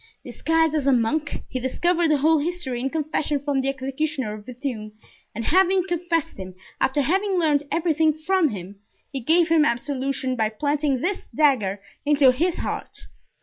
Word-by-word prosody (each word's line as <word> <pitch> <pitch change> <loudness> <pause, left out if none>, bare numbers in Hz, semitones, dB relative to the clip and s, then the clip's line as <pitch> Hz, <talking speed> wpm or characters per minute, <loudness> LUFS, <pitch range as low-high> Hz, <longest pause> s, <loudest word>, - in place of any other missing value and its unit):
Disguised 325 -1 +1
as 295 -3 0
a - - +5
monk 265 +6 0
he 255 - -4
discovered 340 +7 +1
the 305 - +4
whole 315 +3 +3
history 295 -6 -3
in 265 +2 -1
confession 300 -1 -1
from 280 -1 -1
the 270 - -1
executioner 270 -2 -2
of 210 0 -10
Bethune, 240 -4 -5 0.4
and 230 +1 -4
having 375 +1 +3
confessed 345 - -2
him, 185 -1 -8 0.2
after 275 +2 +2
having 380 +6 +1
learned 300 -4 +2
everything 320 -2 +2
from 315 +2 +1
him, 195 -2 -8 0.3
he 275 - -3
gave 320 +6 +3
him 325 -2 +5
absolution 270 -1 -1
by 220 -3 +1
planting 285 +3 -1
this 390 +2 -2
dagger 215 -10 +2 0.2
into 285 -3 +5
his 335 +7 0
heart. - - -5
290 Hz, 165 wpm, -23 LUFS, 255-325 Hz, 0.4 s, a